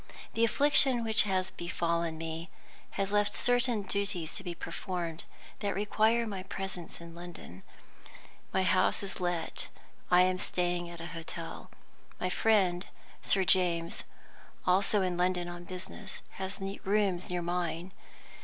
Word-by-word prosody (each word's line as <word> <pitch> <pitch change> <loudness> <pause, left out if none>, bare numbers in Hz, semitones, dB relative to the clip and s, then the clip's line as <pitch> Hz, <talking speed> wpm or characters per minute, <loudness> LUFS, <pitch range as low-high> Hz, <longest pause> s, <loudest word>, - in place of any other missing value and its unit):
The 225 - +2
affliction 265 0 +5
which 220 -1 +4
has 185 -1 +1
befallen 170 -1 -1
me 165 +1 -4 0.5
has 195 0 0
left 205 0 +2
certain 245 -3 +2
duties 195 -4 -2
to - - -3
be 175 -2 -4
performed 170 -1 -4 0.3
that 200 -2 -1
require 220 +3 +3
my 200 -4 -4
presence 190 -2 -6
in 170 0 -10
London. 170 - -9 0.9
My 190 - +2
house 185 +2 +3
is 195 - -5
let; 175 -2 -2 0.4
I 180 0 +7
am 185 0 +2
staying 175 -1 -1
at 170 -1 -8
a - - -5
hotel. 165 0 -6 0.5
My 180 - 0
friend, 190 -4 +3 0.3
Sir 195 - +2
James 175 -3 +2 0.6
(also 195 +2 +3
in 180 -1 0
London 180 0 +1
on 175 0 -7
business), 185 +2 -6 0.2
has 190 +1 -4
rooms 195 -1 0
near 180 -1 -1
mine. 175 0 -2
185 Hz, 135 wpm, -31 LUFS, 175-200 Hz, 0.9 s, I